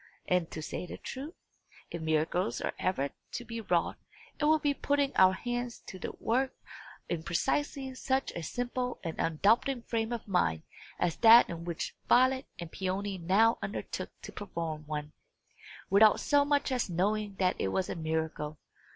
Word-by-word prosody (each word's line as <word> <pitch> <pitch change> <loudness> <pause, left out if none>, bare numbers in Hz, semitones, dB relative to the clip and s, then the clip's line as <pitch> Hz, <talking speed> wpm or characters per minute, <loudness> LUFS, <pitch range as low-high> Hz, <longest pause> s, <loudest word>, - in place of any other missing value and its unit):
And, 180 -2 +1
to 155 - -6
say 180 - -5
the - - -7
truth, 285 +6 -7 0.6
if 170 - -5
miracles 160 +4 0
are - - -2
ever 140 -7 0 0.2
to 240 - -4
be 230 0 -5
wrought, 180 -5 0 0.4
it - - +1
will 310 +1 +5
be 290 -2 +1
by - - -24
putting 285 -1 +1
our 185 0 +6
hands 240 +3 -4
to 185 - -9
the - - -4
work 260 +4 0 0.5
in 170 -2 -2
precisely 270 - -1
such 265 +1 -1
a 170 - -5
simple 245 +7 -3
and 165 -2 -5
undoubting 225 - +2
frame 225 -1 -1
of 235 -2 -4
mind 80 - +1 0.3
as 175 -2 0
that 230 +1 +8
in 170 0 -6
which 170 -2 -4
Violet 260 +2 +4
and 170 -2 -7
Peony 190 +1 -2
now 200 +7 +3
undertook - - -4
to - - -7
perform 165 -6 -5
one, 150 0 -4 0.8
without 210 +2 +6
so 285 -1 +3
much 285 -1 +1
as 250 -5 0
knowing 200 +3 0
that 185 -1 +1
it - - 0
was 185 - 0
a - - -3
miracle. 160 -2 -2
200 Hz, 170 wpm, -31 LUFS, 170-245 Hz, 0.8 s, that